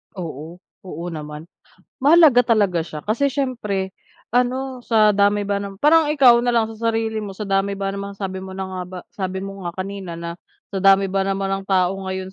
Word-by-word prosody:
Oo, 165 Hz, -2 st, -7 dB, 0.3 s
oo 170 Hz, -1 st, -6 dB
naman. 150 Hz, -1 st, -7 dB, 0.6 s
Mahalaga 285 Hz, -4 st, +6 dB
talaga 190 Hz, -6 st, +1 dB
siya 155 Hz, -2 st, -7 dB
kasi 230 Hz, +7 st, 0 dB
siyempre 220 Hz, -9 st, -2 dB, 0.4 s
ano, 255 Hz, +1 st, 0 dB
sa 215 Hz, -3 st, +4 dB
dami 205 Hz, +1 st, +2 dB
ba 200 Hz, 0 st, -1 dB
ng 200 Hz, -1 st, -7 dB
parang 305 Hz, +6 st, +4 dB
ikaw 260 Hz, -5 st, +6 dB
na 245 Hz, -, -2 dB
lang 230 Hz, -1 st, +3 dB
sa 230 Hz, +1 st, -2 dB
sarili 225 Hz, -1 st, -1 dB
mo 200 Hz, -2 st, -7 dB
sa 210 Hz, -, -4 dB
dami 195 Hz, 0 st, 0 dB
ba 195 Hz, 0 st, -2 dB
naman 200 Hz, 0 st, -6 dB
sabi 190 Hz, -1 st, -4 dB
mo 190 Hz, 0 st, -8 dB
na 190 Hz, -, -3 dB
nga 190 Hz, -1 st, -6 dB
ba 185 Hz, 0 st, -8 dB
sabi 190 Hz, -1 st, -4 dB
mo 195 Hz, 0 st, -8 dB
nga 170 Hz, -, -3 dB
kanina, 190 Hz, -2 st, -5 dB
na 170 Hz, +1 st, -6 dB, 0.3 s
sa 195 Hz, -, -1 dB
dami 195 Hz, 0 st, +5 dB
ba 195 Hz, 0 st, -1 dB
naman 195 Hz, 0 st, -1 dB
ng -, -, -12 dB
tao 185 Hz, -2 st, +3 dB
ngayon 190 Hz, 0 st, -5 dB
195 Hz, 200 wpm, -21 LUFS, 190-225 Hz, 0.6 s, Mahalaga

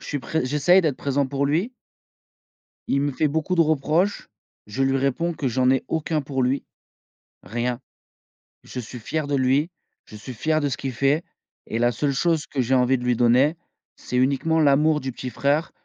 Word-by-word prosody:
je -, -, -12 dB
suis 145 Hz, -, -2 dB
pré 145 Hz, +4 st, -2 dB
j'essaye 150 Hz, +8 st, +4 dB
d'être 150 Hz, -6 st, 0 dB
présent 140 Hz, 0 st, 0 dB
pour 140 Hz, +1 st, -1 dB
lui 180 Hz, -, 0 dB, 1.1 s
il 140 Hz, -, +1 dB
me 145 Hz, 0 st, 0 dB
fait 150 Hz, +4 st, +1 dB
beaucoup 160 Hz, +4 st, -1 dB
de 170 Hz, -, +5 dB
reproches. 160 Hz, +5 st, +1 dB, 0.4 s
Je 105 Hz, +6 st, -4 dB
lui 135 Hz, 0 st, +2 dB
réponds 140 Hz, +6 st, 0 dB
que: 135 Hz, -, -2 dB
«J'en 125 Hz, +1 st, +2 dB
ai 130 Hz, 0 st, +2 dB
aucun 160 Hz, -1 st, -1 dB
pour 135 Hz, -1 st, -2 dB
lui, 130 Hz, +3 st, 0 dB, 0.8 s
rien. 120 Hz, +2 st, -3 dB, 0.8 s
Je 125 Hz, -, -7 dB
suis 120 Hz, +1 st, -8 dB
fier 155 Hz, +6 st, -3 dB
de 145 Hz, -, 0 dB
lui, 135 Hz, +4 st, +2 dB, 0.4 s
je 110 Hz, -, -13 dB
suis 125 Hz, +4 st, -8 dB
fier 155 Hz, +6 st, 0 dB
de 145 Hz, -, 0 dB
ce -, -, -3 dB
qu'il 135 Hz, -1 st, -4 dB
fait, 140 Hz, +6 st, +1 dB, 0.4 s
et 115 Hz, -, -3 dB
la 120 Hz, 0 st, +3 dB
seule 140 Hz, +5 st, -1 dB
chose 160 Hz, +2 st, +1 dB
que 135 Hz, -, -2 dB
j'ai 125 Hz, +2 st, 0 dB
envie 125 Hz, +1 st, +3 dB
de 125 Hz, -, -7 dB
lui 125 Hz, -1 st, +1 dB
donner, 125 Hz, +6 st, +4 dB, 0.4 s
c'est 125 Hz, -, -6 dB
uniquement 140 Hz, +5 st, +2 dB
l'amour 150 Hz, +2 st, +3 dB
du 130 Hz, 0 st, -4 dB
petit 125 Hz, +1 st, -6 dB
frère 145 Hz, +5 st, 0 dB
140 Hz, 195 wpm, -23 LUFS, 130-155 Hz, 1.1 s, de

